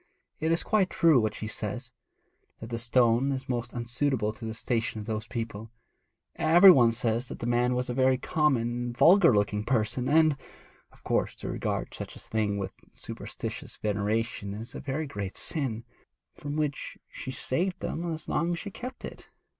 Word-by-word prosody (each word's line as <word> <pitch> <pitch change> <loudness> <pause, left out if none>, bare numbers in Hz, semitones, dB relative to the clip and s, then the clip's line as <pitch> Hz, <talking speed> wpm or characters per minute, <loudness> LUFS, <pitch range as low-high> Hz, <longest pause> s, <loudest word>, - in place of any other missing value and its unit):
It 160 +1 0
is 165 - +2
quite 200 -4 +2
true 160 -7 +4
what 110 -1 -1
she - - -5
says: 110 - -2 0.7
that 115 +1 -9
the 115 - -2
stone 120 +2 +3
was 135 -1 -3
most 120 -2 -2
unsuitable 120 -2 -1
to 115 - -9
the 110 0 -4
station 115 -2 -1
of 105 - -7
those 110 0 -3
people; 115 -2 -5 0.7
every 170 +4 +8
one 120 -8 +5
says 115 +1 -1
that - - -7
the - - -5
man 120 +1 +2
was 125 0 -1
a 125 - -2
very 130 0 +3
common 150 -2 +1
and 120 0 -3
vulgar 175 +3 +7
looking 105 -1 +1
person; 120 +1 0
and 155 -1 +4 0.5
of - - -23
course - - 0
to - - -6
regard - - -3
such - - -6
a - - -10
thing 105 -2 -1
with 95 -1 -4 0.2
superstitious - - -6
veneration 105 0 -2
is 115 +3 -8
a - - -6
very 145 +3 -3
great 100 -8 -5
sin, 130 -8 -1 0.5
from 145 0 -6
which 150 -3 -2
she - - -8
saved 175 +8 +1
them 170 +1 -3
as 160 -1 -5
long 170 +3 0
as - - -2
she 200 - -6
kept 250 +5 -7
it. - - -10
120 Hz, 185 wpm, -28 LUFS, 110-150 Hz, 0.7 s, every